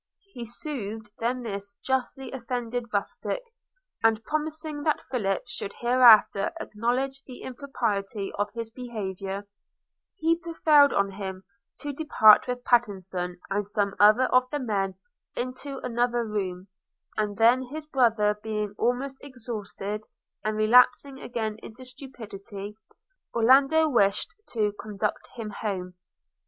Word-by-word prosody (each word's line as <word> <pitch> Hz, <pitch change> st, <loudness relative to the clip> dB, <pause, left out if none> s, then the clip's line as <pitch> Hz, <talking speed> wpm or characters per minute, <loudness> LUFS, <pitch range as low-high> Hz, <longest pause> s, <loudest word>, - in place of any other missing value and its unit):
He 240 Hz, -2 st, -6 dB
soothed 225 Hz, -5 st, -5 dB
then 245 Hz, +2 st, -1 dB
this 200 Hz, -2 st, -5 dB
justly 265 Hz, +1 st, -2 dB
offended 245 Hz, -2 st, -4 dB
rustic, 210 Hz, -, -2 dB, 0.6 s
and, 225 Hz, -1 st, +3 dB
promising 310 Hz, 0 st, -3 dB
that 305 Hz, 0 st, 0 dB
Philip 195 Hz, -7 st, 0 dB
should 240 Hz, -4 st, -5 dB
hereafter 240 Hz, -5 st, +6 dB
acknowledge 255 Hz, +5 st, -1 dB
the 250 Hz, -2 st, -10 dB
impropriety 225 Hz, -7 st, -3 dB
of 205 Hz, +1 st, -1 dB
his 230 Hz, -1 st, -5 dB
behaviour, 200 Hz, -5 st, -5 dB, 0.7 s
he 330 Hz, -2 st, +3 dB
prevailed 310 Hz, -4 st, +4 dB
on 200 Hz, 0 st, +1 dB
him 190 Hz, -1 st, -6 dB, 0.4 s
to 290 Hz, 0 st, -4 dB
depart 260 Hz, -9 st, +6 dB
with 250 Hz, 0 st, -3 dB
Pattenson 190 Hz, -7 st, 0 dB
and 200 Hz, 0 st, 0 dB
some 205 Hz, -1 st, 0 dB
other 215 Hz, +5 st, +7 dB
of 255 Hz, 0 st, +4 dB
the 295 Hz, -, -2 dB
men 200 Hz, -7 st, -1 dB, 0.4 s
into 255 Hz, +3 st, -4 dB
another 240 Hz, 0 st, 0 dB
room; 190 Hz, -3 st, -3 dB, 0.5 s
and 210 Hz, -2 st, -1 dB
then 235 Hz, +4 st, +5 dB
his 295 Hz, +4 st, -7 dB
brother 225 Hz, -7 st, +2 dB
being 210 Hz, -2 st, -3 dB
almost 260 Hz, +3 st, 0 dB
exhausted, 215 Hz, -5 st, -6 dB, 0.4 s
and 215 Hz, 0 st, -1 dB
relapsing 250 Hz, +5 st, +4 dB
again 220 Hz, -4 st, -3 dB
into 225 Hz, +4 st, -11 dB
stupidity, 220 Hz, -6 st, -9 dB, 0.6 s
Orlando 275 Hz, +7 st, +5 dB
wished 200 Hz, -8 st, +2 dB, 0.2 s
to 210 Hz, -3 st, +1 dB
conduct 210 Hz, 0 st, -3 dB
him 225 Hz, -3 st, -5 dB
home. 190 Hz, -4 st, -4 dB
230 Hz, 120 wpm, -27 LUFS, 205-255 Hz, 0.7 s, other